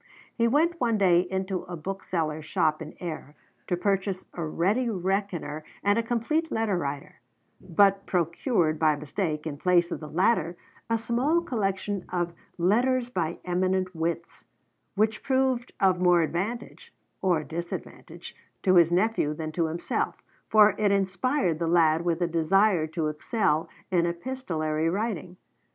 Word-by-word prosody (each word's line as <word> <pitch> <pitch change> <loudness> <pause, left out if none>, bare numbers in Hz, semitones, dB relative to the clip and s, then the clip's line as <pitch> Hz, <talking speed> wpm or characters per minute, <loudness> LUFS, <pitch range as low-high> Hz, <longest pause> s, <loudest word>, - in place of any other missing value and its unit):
He 230 -1 +2
went 325 +7 +2
one 230 -3 +2
day 180 -4 +5
into 190 +1 -2
a 175 -1 -6
bookseller's 160 -3 -3
shop 155 0 +1
in 155 0 -8
Ayr 155 -4 -6 0.3
to 180 - 0
purchase 195 0 -1
a 170 - -4
Ready 195 +10 0
Reckoner 185 -6 -2 0.2
and 205 +2 +3
a - - +3
Complete 245 +8 -1
Letter 220 -3 0
Writer, 140 -4 -5 0.4
but 195 +3 +3
procured 170 - 0
by 155 -1 +4
mistake 150 +1 -3
in 145 -3 -5
place 175 0 +3
of - - -3
the 155 - -8
latter 175 -1 +1 0.3
a 230 - +2
small 245 +9 +1
collection 200 - -2
of 175 -1 -2 0.2
'Letters 240 +7 +2
by 170 -5 -2
Eminent 185 +1 0
Wits,' 170 +1 -3 0.5
which 215 +1 +1
proved 260 -2 0
of 185 -2 +3
more 175 -2 +5
advantage 225 - -4 0.3
(or 175 -5 +2
disadvantage) 170 +3 -7 0.3
to 185 - +4
his 170 -1 +6
nephew 180 -5 +1
than 155 0 -4
to 165 +1 0
himself, 165 +2 -2 0.3
for 215 -1 +6
it 205 -2 +3
inspired 195 - +1
the 170 - -1
lad 165 -1 +3
with 170 0 0
a - - +2
desire 170 +1 +2
to 160 0 -3
excel 155 0 0 0.2
in 170 -2 +3
epistolary 170 -6 -2
writing. 185 -2 -3
180 Hz, 145 wpm, -27 LUFS, 165-215 Hz, 0.5 s, his